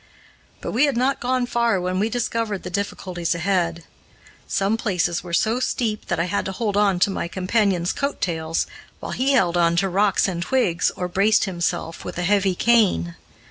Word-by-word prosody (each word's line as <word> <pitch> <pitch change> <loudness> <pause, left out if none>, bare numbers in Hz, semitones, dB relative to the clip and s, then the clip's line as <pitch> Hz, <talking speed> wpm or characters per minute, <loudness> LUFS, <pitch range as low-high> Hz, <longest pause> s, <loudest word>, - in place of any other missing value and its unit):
But - - -4
we 255 +7 +3
had 280 -5 0
not 265 +3 +1
gone 255 0 0
far 235 -4 +1
when 180 +1 -1
we 215 +3 +1
discovered 230 -3 -2
the 180 - -6
difficulties 180 -3 -2
ahead. 170 -2 0 0.6
Some 200 +2 +1
places 180 -6 -1
were 175 - -8
so 220 +7 +1
steep 225 -4 -2
that 175 - -1
I - - +2
had 180 +3 -1
to 190 - -2
hold 205 0 -2
on 205 -3 +3
to 195 - +4
my 180 - -3
companion's 185 0 0
coat 280 0 -2
tails, 165 -2 -1 0.3
while - - -6
he 270 +2 +1
held 180 -9 +3
on 170 -1 +3
to 195 +3 +2
rocks 200 +2 +2
and 175 -3 -3
twigs, 180 -5 +1
or 180 - -3
braced 195 +4 +3
himself 175 -3 -2
with - - -7
a 180 - -1
heavy 195 0 +2
cane. 200 - +2
195 Hz, 190 wpm, -22 LUFS, 175-225 Hz, 0.6 s, to